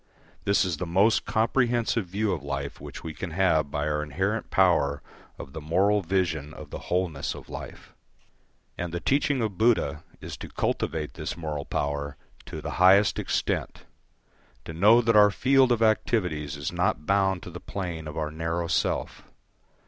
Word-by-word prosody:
This 100 -1 +3
is 90 -4 -2
the 90 - -4
most 100 +6 +3
comprehensive 115 -2 +1
view 100 +3 -1
of 80 - -4
life 70 0 -5
which - - -9
we 80 - -5
can 95 - -5
have 80 -4 +2
by 75 +1 -2
our 75 0 0
inherent 95 +10 -2
power 80 -7 +2 0.3
of 65 - -9
the 80 - -6
moral 95 +7 +2
vision 80 -5 -1
of - - -11
the - - -5
wholeness 90 -6 -1
of - - -12
life. - - -9 0.9
And 85 -1 -3
the 85 - -3
teaching 140 +2 +1
of 105 -5 -3
Buddha 95 -10 +2 0.2
is - - -7
to - - -8
cultivate 80 -2 -2
this - - -5
moral 75 -3 -4
power 70 0 -3 0.3
to - - -6
the - - -4
highest 100 +3 +6
extent, - - -2 0.8
to 80 - -7
know 105 +8 +6
that 115 -1 +2
our 105 -1 +8
field 130 +5 +3
of 115 -1 +2
activities 90 -9 0
is 70 - -3
not 75 - 0
bound 95 -1 +1
to 90 - -8
the 90 - -8
plane 85 -6 -5
of 75 - -7
our 75 -1 -2
narrow 80 +2 -2
self. 80 -1 -1
90 Hz, 170 wpm, -26 LUFS, 75-105 Hz, 0.9 s, our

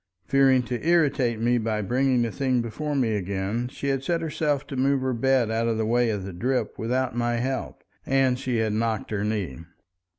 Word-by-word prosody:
Fearing 135 -2 +4
to 120 0 -4
irritate 145 -8 +2
me 120 +1 +2
by 110 -1 -1
bringing 125 +2 +2
the 115 - -2
thing 130 -1 0
before 145 +6 -3
me 120 -5 +1
again, 100 +4 -2
she 140 +2 -4
had 135 -1 0
set 170 +4 0
herself 150 -3 -1
to 140 - -7
move 135 +1 +2
her 130 0 0
bed 125 -1 +2
out 115 +1 0
of 115 -1 0
the 110 - 0
way 120 +1 +2
of 105 -3 -2
the 95 -1 -7
drip 125 +9 -2
without 125 +2 -1
my 120 0 0
help, 130 +3 -3 0.2
and 130 -2 +2
she 125 -2 -1
had 110 -2 0
knocked 110 -1 -1
her 105 -1 -1
knee. 105 -10 -2
120 Hz, 205 wpm, -25 LUFS, 110-135 Hz, 0.2 s, Fearing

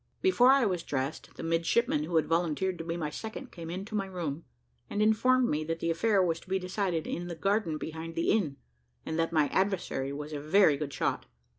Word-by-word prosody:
Before 260 -10 +5
I 270 -2 +5
was 180 -4 0
dressed, 135 -1 -4
the - - -7
midshipman 235 - +1
who 170 - -4
had 160 - +4
volunteered 170 +2 0
to - - -3
be 165 +1 -3
my 150 -3 -3
second 220 - -7
came 165 -2 -8
into 195 +5 -6
my 200 -2 -1
room, 170 -5 -4 0.4
and 205 - -3
informed 240 +4 +4
me 155 -5 0
that 165 +1 -2
the 165 - 0
affair 195 +3 +3
was 165 -2 0
to 185 - -18
be 190 - +2
decided 185 -3 -2
in 175 +1 -4
the 170 - -5
garden 195 -3 0
behind 160 +1 -6
the 165 - +1
inn, 155 -11 +1 0.5
and 160 - -2
that 165 0 +1
my 155 -3 +3
adversary 190 -8 0
was 150 +2 -6
a 145 - -4
very 155 0 +5
good 140 0 -4
shot. - - -1
170 Hz, 215 wpm, -30 LUFS, 160-205 Hz, 0.5 s, Before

